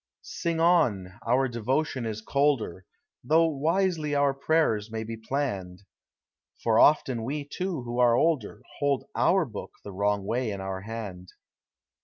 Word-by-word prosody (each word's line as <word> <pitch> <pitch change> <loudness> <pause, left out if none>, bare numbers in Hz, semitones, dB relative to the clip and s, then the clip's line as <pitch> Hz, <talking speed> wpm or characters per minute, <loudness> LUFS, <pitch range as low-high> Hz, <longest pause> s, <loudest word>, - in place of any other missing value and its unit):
Sing 170 -2 -3
on,— 120 - +2
our 130 +3 +3
devotion 125 +2 -1
is 110 -1 -4
colder, 130 -10 0 0.4
Though 160 +6 +4
wisely 160 0 0
our 140 -1 +3
prayers 135 -7 +1
may 110 0 -4
be 115 +1 -5
planned, 110 -7 -3 0.8
For 115 -1 +3
often 130 -6 +4
we, 145 +4 -3
too, 180 -3 -3
who 120 0 -4
are 120 -1 +5
older, 125 -7 0 0.2
Ilold 140 -2 +1
our 190 -1 +3
book 110 -7 -8
the 100 - -8
wrong 100 +1 0
way 120 +2 -1
in 100 -2 -4
our 95 0 -4
hand. 100 -4 -7
125 Hz, 145 wpm, -27 LUFS, 105-150 Hz, 0.8 s, are